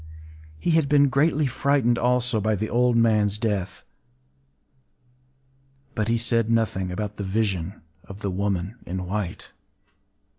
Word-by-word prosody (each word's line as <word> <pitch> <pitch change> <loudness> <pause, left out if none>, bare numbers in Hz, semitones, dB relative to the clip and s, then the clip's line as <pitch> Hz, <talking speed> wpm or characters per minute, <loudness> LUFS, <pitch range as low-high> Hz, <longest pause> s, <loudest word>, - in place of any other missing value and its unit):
He 170 - -1
had 160 -3 +2
been 145 -1 +5
greatly 150 +3 +2
frightened 130 -2 +1
also 125 -2 +1
by 110 +1 +1
the 110 +2 -3
old 120 0 +3
man’s 105 -3 +3
death; 100 -5 -2 2.1
but 110 -2 -1
he 115 0 +2
said 115 -1 +1
nothing 110 -5 0
about 105 +2 -4
the 100 - -4
vision 95 -2 -2 0.3
of 100 +1 -11
the 100 - -2
woman 100 +2 -2
in 90 +1 -4
white. 95 -1 -4
110 Hz, 135 wpm, -24 LUFS, 100-120 Hz, 2.1 s, been